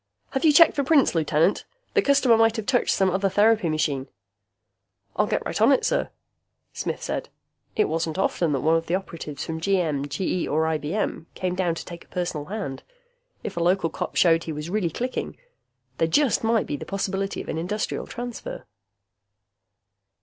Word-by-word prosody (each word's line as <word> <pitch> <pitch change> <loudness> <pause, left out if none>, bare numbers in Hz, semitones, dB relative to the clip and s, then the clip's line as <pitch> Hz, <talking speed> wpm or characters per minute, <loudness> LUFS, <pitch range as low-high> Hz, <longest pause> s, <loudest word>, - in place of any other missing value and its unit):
"Have 270 - -2
you 315 - +6
checked 330 +3 +7
for 285 - +1
prints, 285 0 +4
Lieutenant? 160 +2 +2 0.3
The 420 - +4
customer 280 -7 +4
might 225 0 +4
have 220 -3 -3
touched 250 0 +1
some 190 -1 +2
other 195 +2 +1
therapy 210 -1 +3
machine." 145 -4 -1 1.1
"I'll - - +2
get - - -1
right - - -3
on - - +6
it, - - +3
sir," - - 0 0.6
Smith - - -4
said. - - -3 0.5
It - - +3
wasn't 160 +1 -2
often 175 -4 +1
that 135 - 0
one 160 +2 +3
of 165 0 -1
the 175 - +1
operatives 165 -6 -5
from 160 -1 -5
GM, 160 -7 0
GE, 180 +3 -1
or 155 +2 +1
IBM 160 +2 -2
came 185 -1 -2
down 180 -2 0
to - - -7
take 170 -1 -9
a - - -28
personal 175 -5 -3
hand. 190 -9 -5 0.6
If - - -5
a 170 - +1
local 175 -2 +2
cop - - -5
showed 165 -2 +4
he 160 - -4
was 150 +2 -5
really 200 -4 0
clicking, 250 +10 -4 0.6
there 165 - +3
just 260 - +2
might 225 -1 +2
be 145 - -3
the - - -7
possibility 195 0 -2
of - - -7
an 160 - -3
Industrial 205 +6 -3
Transfer.... 245 -1 -6
180 Hz, 185 wpm, -24 LUFS, 160-215 Hz, 1.1 s, checked